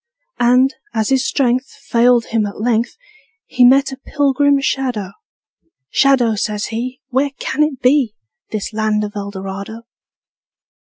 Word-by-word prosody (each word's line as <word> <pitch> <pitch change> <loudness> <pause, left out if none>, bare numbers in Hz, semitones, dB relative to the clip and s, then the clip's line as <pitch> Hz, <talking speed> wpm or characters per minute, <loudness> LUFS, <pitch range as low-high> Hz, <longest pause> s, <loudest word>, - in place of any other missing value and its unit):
And, 250 +3 +4 0.2
as 220 -1 0
his 265 -1 +2
strength 255 -1 +1
Failed 240 -3 +2
him 220 -2 0
at 200 - -9
length, 230 +1 0 0.5
He 250 - +1
met 270 +2 +5
a 265 - -7
pilgrim 285 0 +1
shadow: 250 -8 -2 0.8
``Shadow,'' 245 -6 +3
says 210 -1 -2
he, 250 +3 -4
``Where 275 +1 0
can - - -2
it 300 -4 0
be, 250 -4 +3 0.3
This 215 0 -4
land 215 -1 0
of 205 0 -6
Eldorado?'' 200 +2 -6
245 Hz, 130 wpm, -17 LUFS, 215-270 Hz, 0.8 s, met